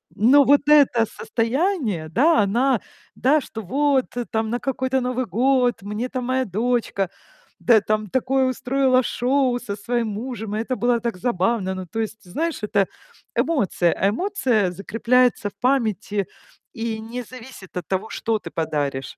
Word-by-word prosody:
Но 265 +7 +6
вот 285 +1 +5
это 275 -6 +5
состояние, 230 - -1
да, 305 - +3
она, 235 +4 +2 0.3
да, 290 +4 +3
что 225 - -7
вот 270 +5 +1 0.3
там: 220 0 -1
на 240 +2 -1
какой-то 260 0 -1
Новый 255 0 -1
год 250 -1 +1
мне 210 +5 -4
там 255 -2 -4
моя 260 +1 0
дочка, 215 -2 -1 0.5
да, 225 -4 +5
там 215 0 -1
такое 260 +2 +1
устроила 255 0 +2
шоу 255 0 +1
со 210 -5 -5
своим 230 +2 -2
мужем. 220 -1 -5
И 215 - -1
это 255 +3 -2
было 240 -1 +1
так 230 -5 -3
забавно. 190 -2 0
Ну, 185 0 -6
то 225 - -5
есть, 220 -1 -4
знаешь, 300 - -3
это 200 -2 +1 0.5
эмоция, 205 - +1
а 195 - +1
эмоция 245 - 0
закрепляется 230 +3 +1
в - - -26
памяти 215 -6 0 0.5
и 225 -1 -3
не 235 +3 -6
зависит 240 -5 -12
от 175 - -5
того, 195 +3 -2
что 225 -1 -1
ты 170 - -9
подаришь. 145 -4 -3
235 Hz, 155 wpm, -22 LUFS, 205-260 Hz, 0.5 s, Но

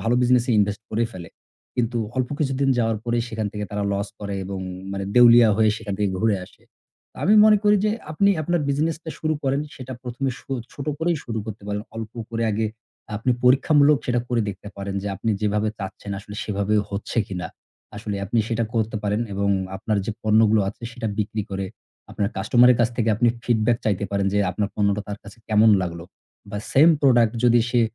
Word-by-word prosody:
ভালো 115 +2 +2
business 125 -1 +4
এ - - +2
invest 105 0 +1
করেই 115 +1 0
ফেলে। 85 -3 -9 0.5
কিন্তু 120 0 0 0.2
অল্প 130 0 0
কিছুদিন 135 -2 0
যাওয়ার 115 -2 +1
পরেই 120 0 0
সেখান 110 -2 -3
থেকে 105 0 -4
তারা 105 0 -2
loss 100 +1 -2
করে 100 -1 -4
এবং 95 0 -5 0.3
মানে 100 0 -3
দেউলিয়া 120 -2 +8
হয়ে 110 -1 +4
সেখান 100 -3 -5
থেকে 100 -2 +1
ঘুরে 110 -3 +2
আসে। - - -21 0.5
তো - - -24
আমি 210 - +5
মনে 215 -1 +7
করি 210 0 +5
যে 215 - +3 0.2
আপনি 200 +6 +3
আপনার 175 +1 0
business 150 +3 0
টা 160 - -5
শুরু 155 0 0
করেন 135 +1 +1 0.2
সেটা 130 0 -7
১ম 125 +1 -7
এ - - -5
সো 135 - -7 0.2
ছোট 140 - -7
করেই 170 +1 +1
শুরু 115 -2 -4
করতে 105 -1 -7
পারেন। 105 0 -2
অল্প 110 0 -6 0.2
করে 115 0 -2
আগে 110 +1 0 0.5
আপনি 125 - -1
পরীক্ষামূলক 140 +3 +5
সেটা 120 -1 +1
করে 120 -1 +1
দেখতে 100 +1 -7
পারেন 100 0 -5
যে 100 - -3
আপনি 110 +4 -1
যেভাবে 105 +1 +1
চাচ্ছেন 100 +1 -7
আসলে 105 +1 -10
সেভাবে 100 0 -1 0.2
হচ্ছে 100 +3 -3
কিনা? 90 -4 -5 0.5
আসলে 105 -1 -4
আপনি 110 +4 0
সেটা 115 0 0
করতে 110 -1 0
পারেন 105 +2 0
এবং 100 +1 0 0.3
আপনার 105 +2 -1
যে - - -1
পণ্যগুলো 110 0 +4
আছে 105 - -9
সেটা 120 -2 -5
বিক্রি 105 0 -1
করে, 95 0 -3 0.4
আপনার 100 - -1
customer 120 +5 +5
এর - - 0
কাছ 115 - +4
থেকে 115 -2 +1
আপনি 120 +2 +3 0.2
feedback 120 0 +2
চাইতে 100 -2 0
পারেন 100 -1 0
যে, 105 - +2
আপনার 100 +2 -2
পণ্যটা 100 0 +1
তার 100 0 -5
কাছে 105 +3 -13
কেমন 110 +1 +5
লাগলো। 85 -1 -5 0.5
বা 105 - -3
same 160 +5 +7
product 120 -5 +5
যদি 120 -1 +5
সে 120 - +3
110 Hz, 205 wpm, -23 LUFS, 100-125 Hz, 0.5 s, দেউলিয়া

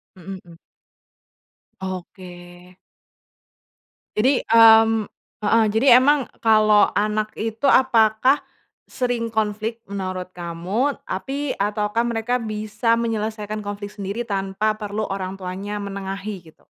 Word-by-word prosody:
Mhm 190 +1 -9
mhm. 170 -1 -16 1.2
Oke. 185 0 -7 1.9
Jadi, 255 +4 +3
mmm 225 -1 +6 0.4
heeh. 225 +2 +4
Jadi 225 +6 +1
emang 275 +1 +4 0.2
kalau 215 -2 +5
anak 215 +1 0
itu 225 +5 0
apakah 255 +1 +4 0.5
sering 245 -2 -2
konflik 220 +1 -3
menurut 185 -2 -5
kamu 180 +10 -2
tapi 275 +8 -3
ataukah 210 +2 -1
mereka 235 +2 -1
bisa 215 +1 -1
menyelesaikan 215 -2 -3
konflik 205 0 -6
sendiri 205 +3 -4
tanpa 200 +1 -1
perlu 210 +1 -3
orangtuanya 195 +1 -5
menengahi 200 0 -5
gitu? - - -26
215 Hz, 100 wpm, -22 LUFS, 195-230 Hz, 1.9 s, mmm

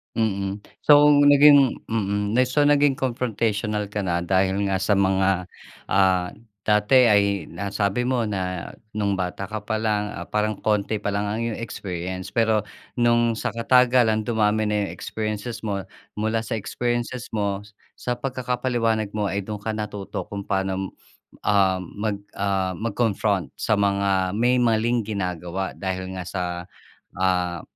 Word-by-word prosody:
Mm, 100 -2 -1 0.2
so 145 0 +7 0.2
naging 145 -2 +6
mm, 105 0 -1
so 145 +3 +2
naging 145 -1 +4
confrontational 110 -5 -1
ka 105 - -2
na 85 -3 -1
dahil 95 +1 +2
nga 95 - +1
sa 105 +2 +2
mga, 95 -1 +2 0.5
ah, 95 -2 +3 0.4
dati 110 +4 +5
ay 100 -4 +2
nasabi 100 +4 -1
mo 125 -2 0
na 90 -3 -3 0.2
nung 105 -2 0
bata 95 +1 -3
ka 110 0 -5
pa 110 0 -2
lang 105 -1 0 0.2
parang 105 0 0
konti 105 0 0
pa 105 - -5
lang 100 - 0
ang 105 +2 -2
iyong 115 -1 -3
experience. 95 -3 -5
Pero 110 -2 +2 0.4
nung 120 -1 +3
sa - - -3
katagalan 120 -2 +3
dumami 110 -2 +1
na 105 -1 +1
yung - - -6
experiences 110 +2 -5
mo 100 -3 -2 0.4
mula 110 +1 0
sa 115 - -3
experiences 120 +2 -3
mo, 100 -2 -1 0.3
sa 125 -1 -3
pagkakapaliwanag 125 -4 -1
mo 105 -2 -1
ay 100 - -1
dun 105 -2 -5
ka 110 - -1
natuto 105 -2 -5
kung 100 -1 -6
paano, 95 -1 -2 0.6
ah, 95 -3 +3
mag, 105 +4 -3 0.2
ah, 95 -2 0
mag-confront 105 - 0
sa 105 - +2
mga 100 -2 +1
may 120 +2 +3
maling 120 -1 +2
ginagawa 95 -2 -3
dahil 95 -1 -4
nga 90 - -4
sa 90 -2 -3 0.8
ah, 90 -3 0
105 Hz, 145 wpm, -23 LUFS, 95-115 Hz, 0.8 s, so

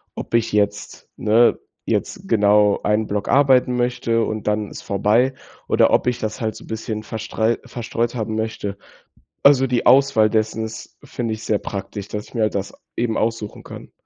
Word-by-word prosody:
ob - - -7
ich 115 -1 +2
jetzt 105 0 -1
ne, 115 +3 +3 0.3
jetzt - - -2
genau 105 -1 +3
einen 105 +1 +1
Block 105 0 -2
arbeiten 130 -3 +4
möchte 120 -2 0
und 110 -1 -4
dann 105 -1 0
ist - - -8
vorbei, 110 +7 +2 0.3
oder - - +3
ob - - +2
ich 125 - +1
das 110 0 -4
halt 110 -1 -2
so - - -11
'n - - -15
bisschen 110 -1 -4
verstrei 110 +1 -1
verstreut 120 0 -3
haben 110 -1 -3
möchte. 110 -2 -3 0.7
Also, 135 -2 +6
die 125 -1 0
Auswahl 125 -4 +5
dessen 110 0 0
ist, 110 0 -9
finde 115 -2 -3
ich, 110 - -7
sehr 105 - 0
praktisch, 100 0 -6
dass 105 0 -5
ich - - -19
mir 115 - -1
halt 105 - 0
das 100 0 -3 0.2
eben 115 -2 0
aussuchen 110 -2 -3
kann. - - -11
110 Hz, 185 wpm, -21 LUFS, 105-120 Hz, 0.7 s, Also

